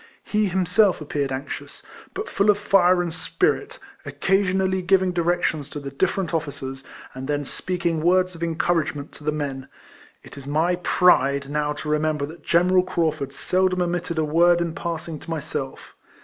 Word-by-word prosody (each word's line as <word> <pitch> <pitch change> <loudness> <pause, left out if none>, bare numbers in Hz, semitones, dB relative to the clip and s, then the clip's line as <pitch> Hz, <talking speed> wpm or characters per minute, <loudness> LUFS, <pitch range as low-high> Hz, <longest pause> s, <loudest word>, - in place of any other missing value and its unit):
lie 210 0 +3
him 190 -1 0
self 195 +1 +3
appeared 145 -2 -2
anxious, 135 +2 -6 0.3
but 410 +3 -4
full 200 +2 +1
of 205 - +5
fire 185 -3 +4
and 170 -2 -4
spirit, 390 - -1 0.3
occasionally 190 -1 +1
giving 190 0 +3
directions 170 -4 0
to 145 - -6
the 140 -1 -7
<lirterent 170 +5 -1
officers, 135 -4 -4 0.3
and 130 0 -7
then 145 -1 -1
speaking 170 0 -2
words 185 +2 +3
of 165 - -12
encouragement 160 -3 -1
to - - -13
the 150 - 0
men. 140 -3 -4 0.6
It - - -11
is 135 - -11
my 165 +5 +1
pride 140 -6 +3
now 150 0 0
to 150 - -7
remember 150 -1 0
that 160 +4 -11
General 180 +2 +4
Craufurd 160 -6 -1
seldom 185 +5 +1
omitted 175 -1 -2
a 160 - +2
word 170 +3 +4
in 170 -1 -2
passing 165 -2 -5
to - - -12
myself. 145 -4 -5
170 Hz, 165 wpm, -23 LUFS, 150-180 Hz, 0.6 s, of